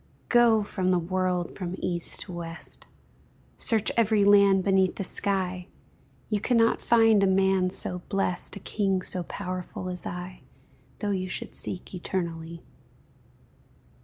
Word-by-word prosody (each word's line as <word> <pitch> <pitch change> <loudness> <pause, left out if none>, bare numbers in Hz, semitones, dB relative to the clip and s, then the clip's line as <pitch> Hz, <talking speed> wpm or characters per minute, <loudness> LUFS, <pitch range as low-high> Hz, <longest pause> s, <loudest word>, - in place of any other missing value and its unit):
Go 235 -3 +5
from 190 -2 -2
the 185 - +3
world 180 0 -1
from 180 -2 -4
East 175 -2 -1
to - - -7
West, 165 -1 -3 0.7
Search 220 -2 +1
every 220 -3 +3
land 200 -2 +6
beneath 190 -1 +2
the - - -3
sky, 185 -2 -1 0.6
You 210 -2 -1
cannot 230 -1 +3
find 225 -3 +5
a 195 - +4
man 190 -1 +3
so 180 -1 -3
blest, 195 -2 -1
A - - -7
king 195 -2 -1
so 180 - -4
powerful 185 +1 -5
as 180 0 -5
I, 180 +1 -7 0.6
Though 205 -1 -2
you 185 -1 -2
should - - -5
seek 180 - -3
eternally. 170 -2 -4
185 Hz, 135 wpm, -27 LUFS, 180-200 Hz, 0.7 s, land